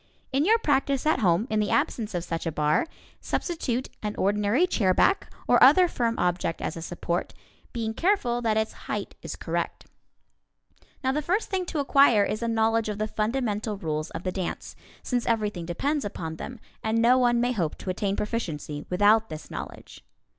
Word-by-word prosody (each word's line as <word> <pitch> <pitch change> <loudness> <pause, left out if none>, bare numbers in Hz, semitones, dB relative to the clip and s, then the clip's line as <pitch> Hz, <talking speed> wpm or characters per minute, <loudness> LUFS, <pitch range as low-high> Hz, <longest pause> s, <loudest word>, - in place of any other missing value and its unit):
In 275 +3 +2
your 445 +4 +5
practice 275 - +1
at 310 -3 +3
home, 185 0 +3
in 215 - +2
the 210 - 0
absence 220 -4 0
of 175 - -1
such 165 -1 -4
a - - 0
bar, 150 - +1 0.3
substitute 260 -7 -2
an 210 -1 -3
ordinary 210 - +2
chairback 225 - +2 0.2
or - - +4
other 365 -1 +8
firm 235 -7 -1
object 175 -2 0
as - - -3
a 165 - -6
support, 175 +1 -3 0.4
being 225 -2 -3
careful 250 - +1
that 220 -2 +1
its 220 0 0 0.2
height - - -3
is - - -6
correct. - - -3 1.2
Now 260 - +2
the 300 +3 -1
first 380 +10 -1
thing 375 -2 0
to 330 - -4
acquire 275 -6 +5
is 215 +2 -3
a 235 - -1
knowledge 225 -1 +1
of 210 - -3
the 215 +1 -1
fundamental 215 -2 -1
rules 155 -3 -3
of 165 - -7
the 185 - -1
dance, 185 -1 -5 0.3
since 245 -2 -1
everything 210 -7 -1
depends 280 - -1
upon 160 -5 -5
them, 250 +6 -7 0.2
and 220 +1 +1
no 245 +3 +5
one 240 -1 +3
may 245 +1 +1
hope 175 -10 -2
to 185 - -4
attain 195 +2 -1
proficiency 160 -10 -4
without 210 +4 +4
this 155 -1 -8
knowledge. - - -8
220 Hz, 180 wpm, -26 LUFS, 185-255 Hz, 1.2 s, other